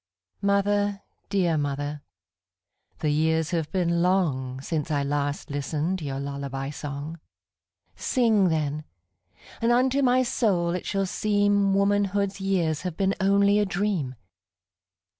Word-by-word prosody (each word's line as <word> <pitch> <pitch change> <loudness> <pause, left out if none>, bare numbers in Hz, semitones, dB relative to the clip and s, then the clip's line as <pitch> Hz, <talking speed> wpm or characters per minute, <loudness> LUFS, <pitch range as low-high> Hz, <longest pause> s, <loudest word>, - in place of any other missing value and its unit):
Mother, 200 0 +1 0.3
dear 175 -6 +1
mother, 145 +1 -3 1.0
the 150 - +1
years 160 +2 +1
have 165 -3 -1
been 170 -2 +1
longSince 150 -4 0
I 145 -2 +1
last 145 0 -2
listened 150 +6 -2
your 135 -3 -3
lullaby 140 -1 -4
song:Sing, 165 - -2
then, 155 -1 -1 0.8
and 230 +1 +3
unto 260 +3 +3
my 255 -1 +4
soul 190 -8 +1
it 180 - -3
shall 195 -1 0
seemWomanhood's 200 0 +1
years 175 -6 0
have 180 -3 -5
been 195 -1 +2
only 200 +1 +4
a 210 - +2
dream. 185 -9 -1
175 Hz, 110 wpm, -26 LUFS, 145-200 Hz, 1.0 s, my